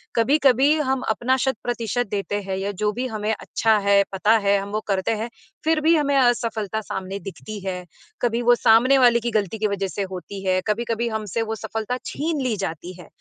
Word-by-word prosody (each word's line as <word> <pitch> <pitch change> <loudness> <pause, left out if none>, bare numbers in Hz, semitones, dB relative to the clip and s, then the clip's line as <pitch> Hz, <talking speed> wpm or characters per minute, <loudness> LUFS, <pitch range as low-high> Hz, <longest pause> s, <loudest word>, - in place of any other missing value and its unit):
कभी-कभी 270 +3 +4 0.2
हम 265 -1 +1
अपना 245 +4 +1
शत-प्रतिशत 245 -1 -2
देते 205 0 -2
हैं 190 -1 -4
या 195 +1 -2
जो 210 - +2
भी 250 +4 -3
हमें 215 -2 -2
अच्छा 220 +1 +1
है, 200 0 +5
पता 205 +4 +3
है, 200 -1 +2
हम 200 - -6
वो 215 - -1
करते 195 +1 0
हैं, 230 - -3 0.3
फिर 315 0 +2
भी 325 +2 +4
हमें 285 -2 +1
असफलता 225 -4 +1
सामने 190 -1 -5
दिखती 205 +2 -8
है। 180 -1 -3 0.4
कभी 235 0 +1
वो 240 0 +5
सामने 240 +4 +5
वाले 240 -2 +5
की 235 0 -3
गलती 210 -1 -1
की 215 - +1
वज़ह 200 -1 -2
से 200 +1 -3
होती 190 +1 -7
है, 185 0 +2
कभी-कभी 230 +2 -1
हमसे 220 0 -3
वो 225 0 -2
सफलता 225 +3 -4
छीन 310 -1 -2
ली 245 -4 0
जाती 180 -2 -5
है, 175 - -12
220 Hz, 200 wpm, -23 LUFS, 200-245 Hz, 0.4 s, है